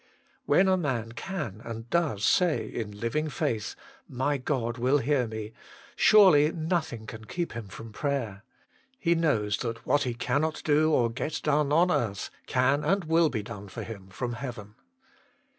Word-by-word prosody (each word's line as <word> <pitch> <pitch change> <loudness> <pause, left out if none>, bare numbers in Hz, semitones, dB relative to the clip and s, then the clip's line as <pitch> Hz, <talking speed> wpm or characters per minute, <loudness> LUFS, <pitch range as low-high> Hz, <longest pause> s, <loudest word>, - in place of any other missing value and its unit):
When 190 - +5
a 190 0 +4
man 125 -9 -2
can, 125 - -5
and 115 0 -7
does 150 -12 +1
say, 180 -4 +3
in 105 -3 -6
living 150 +8 -1
faith, 115 -5 -2 0.2
" - - -34
My 145 0 +1
God 125 -3 -2
will 130 +4 +3
hear 135 -2 +1
me! 110 0 -6 0.2
" - - -22
surely 175 -8 +6
nothing 160 -8 -2
can 110 0 -9
keep 175 +9 -3
him 115 -3 -6
from 110 +4 -10
prayer. 120 -7 -2 0.5
He 170 -9 +2
knows 115 -12 +1
that 115 -2 -5
what 145 - +3
he 125 -4 -1
cannot 155 +6 -1
do 155 +1 +3
or 120 -6 +3
get 145 +6 -3
done 150 -1 +2
on 175 +4 +4
earth, 100 - -1 0.2
can 135 +3 +2
and 195 -1 +1
will 165 0 +3
be 110 -6 -3
done 105 -2 -8
for - - -7
him 100 -4 -9
from 120 +5 -4
heaven. 120 -4 -7
130 Hz, 175 wpm, -28 LUFS, 115-155 Hz, 0.5 s, surely